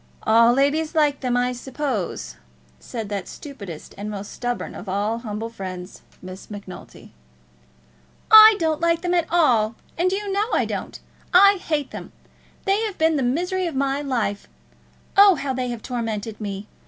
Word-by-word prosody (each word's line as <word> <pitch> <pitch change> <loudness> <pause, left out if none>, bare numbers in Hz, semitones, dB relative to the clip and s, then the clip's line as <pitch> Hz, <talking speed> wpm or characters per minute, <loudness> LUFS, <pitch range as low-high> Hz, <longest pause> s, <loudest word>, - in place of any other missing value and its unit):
"All 230 +2 +5
ladies 290 +5 +1
like 295 -2 +2
them, 250 -2 0
I 250 0 +1
suppose," 250 - -4 0.4
said 225 -3 -6
that 200 -3 -4
stupidest 200 - -9
and 205 +1 -4
most 205 -1 -6
stubborn 245 0 -4
of 190 - -8
all 205 +4 -1
humble 225 0 -5
friends, 185 -3 -8 0.2
Miss 185 +1 -10
Macnulty. 200 -3 -11 1.2
"I 435 0 +10
don't 320 -3 -1
like 335 0 +2
them 355 0 -1
at 340 -2 +1
all, 235 -10 +3 0.2
and 365 +2 +2
you 400 +1 -2
know 410 +3 0
I - - +2
don't. - - -5 0.4
I 395 +2 +7
hate 305 -6 -2
them. - - -9 0.5
They 395 +1 +2
have 430 -4 -3
been 320 0 +2
the 285 - 0
misery 355 +9 0
of 325 - -5
my 275 +1 0
life. 235 -8 -2 0.7
Oh, 400 -1 +7
how 280 -3 -3
they 255 -1 -2
have 235 -2 -6
tormented 225 -3 -4
me! 200 0 -5
255 Hz, 165 wpm, -22 LUFS, 215-330 Hz, 1.2 s, I